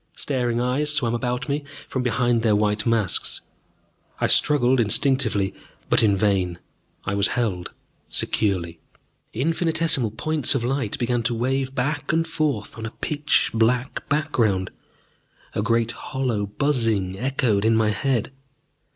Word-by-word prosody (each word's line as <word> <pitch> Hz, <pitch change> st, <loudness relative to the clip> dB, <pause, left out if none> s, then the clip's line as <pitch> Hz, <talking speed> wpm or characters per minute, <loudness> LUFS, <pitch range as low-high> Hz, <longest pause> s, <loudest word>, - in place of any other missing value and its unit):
Staring 125 Hz, -4 st, -1 dB
eyes 130 Hz, +5 st, 0 dB
swam 125 Hz, -6 st, +1 dB
about 125 Hz, +3 st, -2 dB
me 145 Hz, +1 st, -1 dB, 0.2 s
from 130 Hz, -, -2 dB
behind 120 Hz, -1 st, +1 dB
their 110 Hz, -2 st, +3 dB
white 105 Hz, +1 st, +1 dB
masks. 115 Hz, -5 st, 0 dB, 0.8 s
I -, -, +1 dB
struggled 130 Hz, -3 st, +3 dB
instinctively, 115 Hz, -3 st, +2 dB, 0.4 s
but -, -, +5 dB
in 105 Hz, -3 st, +4 dB
vain 95 Hz, -4 st, +1 dB, 0.5 s
I 95 Hz, -, -1 dB
was 100 Hz, 0 st, +3 dB
held 100 Hz, -8 st, -1 dB, 0.4 s
securely. 85 Hz, -5 st, 0 dB, 0.5 s
Infinitesimal 160 Hz, -2 st, 0 dB
points 145 Hz, +6 st, -1 dB
of 125 Hz, -, 0 dB
light 130 Hz, -3 st, -1 dB
began 120 Hz, -1 st, 0 dB
to 120 Hz, +1 st, -1 dB
wave 130 Hz, +3 st, -1 dB
back 145 Hz, +4 st, -1 dB
and 165 Hz, +1 st, +1 dB
forth 145 Hz, -10 st, -2 dB
on 110 Hz, -, -4 dB
a 115 Hz, -, -11 dB
pitch 150 Hz, 0 st, +1 dB
black 120 Hz, +4 st, 0 dB
background; 115 Hz, -11 st, +1 dB, 0.8 s
a -, -, -1 dB
great 115 Hz, +1 st, +1 dB
hollow 120 Hz, -6 st, -2 dB
buzzing 110 Hz, -6 st, 0 dB
echoed 125 Hz, -5 st, +1 dB
in 110 Hz, +1 st, +3 dB
my 110 Hz, -1 st, +3 dB
head. 125 Hz, +3 st, -1 dB
120 Hz, 135 wpm, -23 LUFS, 105-135 Hz, 0.8 s, but